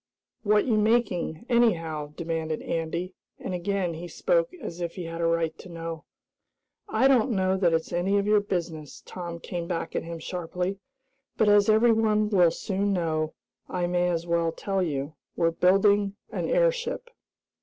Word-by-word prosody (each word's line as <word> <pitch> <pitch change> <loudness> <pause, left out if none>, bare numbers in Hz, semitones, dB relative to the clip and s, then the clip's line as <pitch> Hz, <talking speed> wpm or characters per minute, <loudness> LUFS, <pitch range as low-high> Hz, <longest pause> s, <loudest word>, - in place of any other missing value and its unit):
What 210 -1 +3
you 220 -4 +2
making, 210 -6 +1
anyhow?" 165 - +1
demanded 160 -2 -3
Andy, 170 +3 -3 0.2
and 185 - -5
again 180 0 -1
he 170 +2 -7
spoke - - +1
as 175 - -7
if 170 -1 -3
he 180 - -5
had 165 0 -5
a 165 - +2
right 165 -1 0
to 185 - -11
know. 165 -1 -6 0.8
"I 240 +5 +3
don't 265 -2 +4
know 190 -4 +1
that 180 -3 +3
it's 165 +1 -1
any 185 +4 +1
of 200 - +1
your 210 0 +4
business," 170 -7 -4
Tom 175 -2 -6
came 170 0 -5
back 165 -2 -3
at - - +1
him 165 0 -6
sharply, 180 +3 -4 0.6
"but, 215 - +4
as 205 0 +5
everyone 220 -1 +4
will 180 -4 +5
soon 200 +3 -1
know, 160 -3 -1 0.3
I 180 -1 -1
may 175 0 +1
as 170 -1 -1
well 170 -1 +1
tell 195 +3 -2
you. 145 -3 -2 0.2
We're 165 -1 +2
building 195 +3 +3 0.2
an - - -2
airship." - - 0
180 Hz, 165 wpm, -26 LUFS, 165-210 Hz, 0.8 s, as